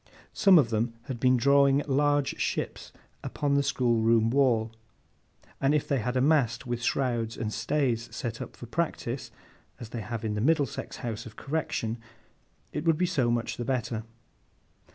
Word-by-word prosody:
Some 195 -3 +6
of 125 -7 +3
them 115 +1 0
had 125 -2 -6
been 130 +1 +4
drawing 140 +2 +4
large 145 0 +1
ships - - -3 0.3
upon 145 -2 -1
the 140 - +4
schoolroom 115 -4 +2
wall; 120 -5 +2 0.9
and 140 +2 +3
if 150 - 0
they 140 - +1
had 125 +3 -1
a - - +2
mast 130 -5 +2
with 120 -1 -3
shrouds 120 -3 -1
and 110 -1 -3
stays 120 -1 0
set 120 0 -5
up - - -7
for - - -8
practice 130 -3 -3 0.5
(as 115 - -8
they 120 -1 -5
have 115 +2 -5
in 105 - -1
the 105 - -2
Middlesex 145 -1 0
House 115 0 -4
of 110 - -13
Correction), 130 -6 -3 0.7
it - - -3
would 165 -2 +3
be 180 - +2
so 145 -10 +1
much 120 0 -1
the 120 - -3
better. 120 -3 -2
125 Hz, 170 wpm, -28 LUFS, 115-140 Hz, 0.9 s, Some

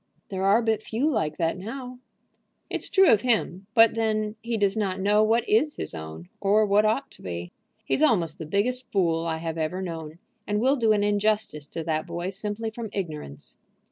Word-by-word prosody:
"There 190 -1 -3
are 210 +4 +4
but 220 -1 +1
few 230 +7 -1
like 155 - 0
that 165 +1 0
now." 250 +5 -7 0.7
"It's - - -2
true 385 -1 +6
of 210 - +4
him. 205 -6 0
But 225 -1 +7
then 215 -1 -1
he 230 -1 -2
does 200 -2 +1
not 195 -4 -1
know 205 +2 +3
what 225 +2 +2
is 400 -8 +2
his - - -5
own, 80 +1 -8
or 205 +2 +3
what 205 +1 +3
ought 225 +6 0
to - - -17
be. 85 -1 -6 0.3
He's - - 0
almost 180 - +2
the 160 - -6
biggest 245 +8 -1
fool 170 -4 +1
I 160 -1 -1
have 165 0 -4
ever 160 +4 -2
known, 165 -4 -6 0.3
and 210 0 0
will 260 +5 +3
do 230 -5 +2
an 205 -1 +3
injustice 205 -7 0
to 165 - -5
that 155 -1 -2
boy 175 +2 -3
simply 210 +3 -4
from 225 0 -6
ignorance." 155 - -6
205 Hz, 200 wpm, -26 LUFS, 165-225 Hz, 0.7 s, But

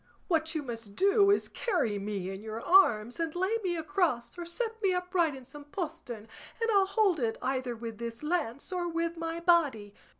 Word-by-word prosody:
What 325 -2 0
you 310 - -1
must 230 -5 -7
do 400 +1 +4
is 405 - +3
carry 290 - -1
me 195 -2 -3
in 195 +1 -7
your 220 +1 -5
arms, 240 - +4
and 330 -1 -2
lay 380 +6 +1
me 355 -2 0
across 330 -7 0
or 350 -1 -6
set 450 +5 -3
me 390 -3 +3
upright 360 -4 +1
in 260 -1 -11
some 290 +2 -11
postern, 300 - -6 0.3
and 455 0 +1
I'll 395 -2 +4
hold 390 -4 +2
it 230 -3 0
either 255 -2 -2
with 225 -1 -7
this 235 +2 -6
lance 300 -4 -2
or 355 -1 -1
with 335 0 -1
my 330 0 -3
body." 295 - +2
325 Hz, 195 wpm, -30 LUFS, 235-360 Hz, 0.3 s, do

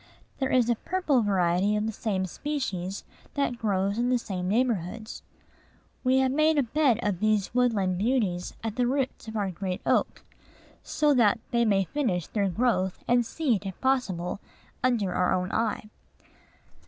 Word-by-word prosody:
There 265 -1 0
is 250 -3 +3
a 240 - +3
purple 300 0 0
variety 190 0 +2
of 210 0 0
the 220 - -1
same 200 -3 -2
species, 195 - -4 0.3
that 275 -4 -1
grows 200 -1 0
in 245 +1 +1
the 250 - +3
same 185 -6 -4
neighborhoods. 220 -2 -1 0.8
We 260 0 +3
have 265 -1 +3
made 310 +2 +3
a 285 - +4
bed 255 -1 +2
of 200 -4 -1
these 215 -1 +1
woodland 210 -8 +1
beauties 205 -6 0
at 225 0 -4
the 245 -1 +2
roots 265 -2 -2
of 220 0 -5
our 200 -2 -1
great 185 +1 -4
oak, - - +1 0.6
so 300 -1 +1
that 235 -3 +4
they 235 0 +2
may 200 -3 +3
finish 190 - -1
their 200 -3 -1
growth, 190 -2 0
and 245 0 +4
seed, 235 -4 -1
if 190 - -7
possible, 200 -10 0 0.4
under 230 -7 +1
our 180 - +1
own 185 0 -2
eye. 220 -1 -1
220 Hz, 165 wpm, -27 LUFS, 190-255 Hz, 0.8 s, a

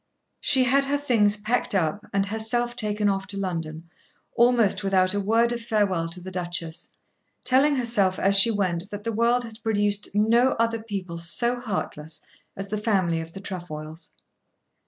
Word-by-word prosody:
She 260 -1 +3
had 275 +2 +2
her 285 +1 0
things 225 -7 +2
packed 220 +1 0
up, 195 +4 -1
and 195 0 +1
herself 225 +3 0
taken 210 -2 -1
off 195 -1 -1
to 200 +1 -4
London, 165 -4 -4 0.5
almost 235 -5 +3
without 190 -1 +2
a 205 - 0
word 225 +4 +2
of 240 - -4
farewell 200 -7 0
to 175 +2 -3
the 185 +1 -9
Duchess, 175 -2 -5 0.5
telling 275 +3 +3
herself 220 -7 +1
as 200 +1 +2
she 200 +4 +8
went 190 -3 -1
that 205 0 -7
the 230 - -2
world 235 +3 +2
had 225 -1 -11
produced 205 -2 0
no 230 +5 +3
other 230 0 -1
people 190 -6 -6
so 235 +9 -1
heartless 160 -9 -5 0.4
as 195 0 -6
the 215 +1 -2
family 185 -7 +1
of 165 +1 -10
the 195 - -8
Trefoils. 165 -4 -7
205 Hz, 170 wpm, -25 LUFS, 185-230 Hz, 0.5 s, she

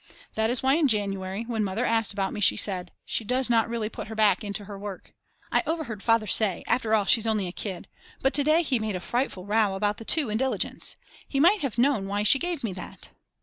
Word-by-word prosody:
That 220 0 0
is 245 +1 -1
why 270 +3 +3
in 320 -3 +3
January, 200 -2 -1
when 230 -2 -2
Mother 205 +5 -1
asked 225 -2 +1
about 195 -2 -2
me, 210 - -5
she - - +5
said: 180 -3 +1
"She - - -1
does 250 +3 0
not 230 -1 +3
really 230 -2 -2
put 215 0 -7
her 220 - -7
back 210 -3 +3
into 205 0 -4
her 200 - -8
work." 200 -1 -8 0.4
I - - +3
overheard 310 -11 -3
Father 225 -1 +2
say: 205 -2 +3
After 220 -3 +2
all 205 -2 +1
she's 225 +2 +3
only 215 -3 0
a 175 - -5
kid, 190 -1 -6 0.3
but 270 - +1
to 285 - +4
day 310 +4 +3
he 265 -6 0
made 215 -2 -3
a - - -3
frightful 215 -2 -2
row 210 -1 +1
about 205 +1 0
the - - -9
2 290 -6 +1
in 215 - -1
Diligence. 265 0 -2 0.3
He 275 - -2
might 365 +8 +5
have 265 -5 -3
known 245 -5 +2
why 205 +1 -1
she 240 +6 +5
gave 345 -4 -2
me 215 -5 -2
that. 180 - -9
220 Hz, 240 wpm, -26 LUFS, 200-250 Hz, 0.4 s, she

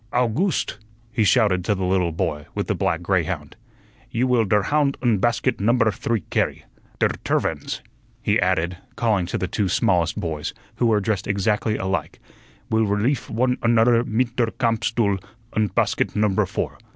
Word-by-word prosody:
"Owgooste!" 125 - 0 0.3
he 115 -3 +1
shouted 105 -5 +3
to 105 +3 +1
the 95 - -3
little 90 -2 +1
boy 80 -3 -2
with - - -1
the - - 0
black - - -1
greyhound, - - -1 0.5
"you 120 +2 0
will 125 -3 +3
der 105 +1 +2
hound 145 +4 +1
und 115 -6 +1
basket 120 +2 +1
number 115 +1 +3
three 110 +2 -1
carry. - - 0 0.3
Der - - +3
tervins," - - -1 0.4
he - - +1
added, 85 +2 +1 0.2
calling 105 -7 +1
to - - -2
the 90 - -2
two 100 0 -1
smallest 85 -2 +1
boys, 80 -3 -4 0.2
who 120 - +2
were 110 -2 +3
dressed 100 -2 -1
exactly 105 +2 0
alike, 95 -5 -3 0.5
"will 110 -1 +3
releef 105 +7 0
one 125 +2 +1
unudder 115 0 +4
mit 120 +1 -1
der 120 -2 +3
camp 115 -2 0
stuhl 100 -5 +1 0.3
und 105 -4 0
basket - - +1
number 105 -2 +2
four. - - -4
110 Hz, 165 wpm, -23 LUFS, 95-120 Hz, 0.5 s, unudder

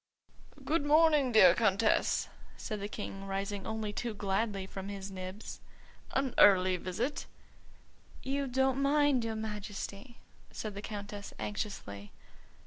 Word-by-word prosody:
"Good 300 +2 +1
morning, 300 -3 +4
dear 190 -6 +8
Countess," 215 +2 +2 0.3
said 215 -2 -4
the 200 - -2
King, 195 -2 -6
rising 195 0 -3
only 220 -1 -3
too 230 0 -3
gladly 200 0 -1
from 195 +1 -7
his 195 -1 -6
nibs; 185 +2 -7 0.5
"an 265 -2 0
early 185 -2 +6
visit." 205 - -3 1.0
"You 275 +1 -1
don't 265 +1 +1
mind, 285 -2 +3
your 225 -1 -2
Majesty?" 210 +1 -6 0.3
said 215 -2 -5
the 200 - -6
Countess 205 -1 -7
anxiously. 105 - -5
210 Hz, 125 wpm, -32 LUFS, 195-250 Hz, 1.0 s, dear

